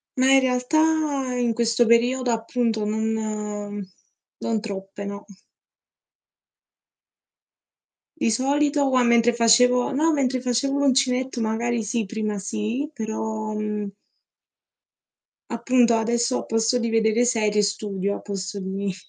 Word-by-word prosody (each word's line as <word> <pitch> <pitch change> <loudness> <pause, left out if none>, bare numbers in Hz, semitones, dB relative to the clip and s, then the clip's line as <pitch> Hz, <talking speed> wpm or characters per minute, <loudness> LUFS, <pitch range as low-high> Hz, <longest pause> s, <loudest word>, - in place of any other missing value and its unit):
Ma 265 +1 +3
in 270 - +7
realtà 275 +1 +1
in 240 -2 0
questo 235 +1 +2
periodo, 245 +2 +2
appunto, 225 -1 -1
non 210 -2 -3 0.6
non 225 -2 -1
troppe 200 -2 -7
no. 200 0 -7 2.9
Di - - +1
solito 285 +4 +1
qua 255 -1 +3
mentre 235 0 +4
facevo 245 +3 +4
no 310 +4 +2
mentre 260 -3 0
facevo 255 +3 0
l'uncinetto, 260 -2 +1
magari 230 +1 -1
sì, 225 +2 -1
prima 215 0 -3
sì, 220 +8 -3
però, 220 -2 -4
mhmm 210 -1 -3 1.6
Appunto, 235 0 +3
adesso 235 +3 0
a - - -5
posto 225 +2 +1
di 230 -1 -2
vedere 225 +1 +2
serie, 215 -3 +1
studio 200 -1 -2
al - - -8
posto 195 0 -5
di 195 0 -3
230 Hz, 115 wpm, -23 LUFS, 215-250 Hz, 2.9 s, in